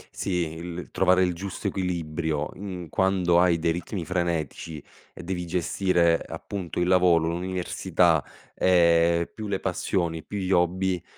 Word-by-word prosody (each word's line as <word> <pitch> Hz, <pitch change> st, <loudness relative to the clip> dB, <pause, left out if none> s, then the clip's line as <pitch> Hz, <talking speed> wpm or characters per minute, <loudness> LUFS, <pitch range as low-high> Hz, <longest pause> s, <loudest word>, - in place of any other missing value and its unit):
Sì, 90 Hz, -3 st, -1 dB
il 85 Hz, +1 st, -7 dB
trovare 95 Hz, 0 st, +3 dB
il 90 Hz, -1 st, +1 dB
giusto 100 Hz, +3 st, -5 dB
equilibrio 80 Hz, -5 st, -2 dB
in 90 Hz, -4 st, -7 dB
quando 95 Hz, -2 st, +2 dB
hai 90 Hz, -2 st, +4 dB
dei 85 Hz, 0 st, +1 dB
ritmi 90 Hz, +1 st, -4 dB
frenetici 85 Hz, -3 st, -2 dB, 0.3 s
e -, -, -11 dB
devi 90 Hz, -1 st, -4 dB
gestire 85 Hz, -1 st, +2 dB
appunto 95 Hz, -5 st, -5 dB
il 90 Hz, -, +1 dB
lavoro, 90 Hz, -3 st, +4 dB
l'università, 90 Hz, -2 st, +1 dB, 0.3 s
ehm, 85 Hz, -1 st, +3 dB
più 110 Hz, -1 st, -6 dB
le 100 Hz, -1 st, -1 dB
passioni, 85 Hz, -3 st, -1 dB
più 105 Hz, -, -6 dB
gli 95 Hz, -1 st, -2 dB
hobby, 90 Hz, 0 st, +1 dB
90 Hz, 140 wpm, -26 LUFS, 85-95 Hz, 0.3 s, hai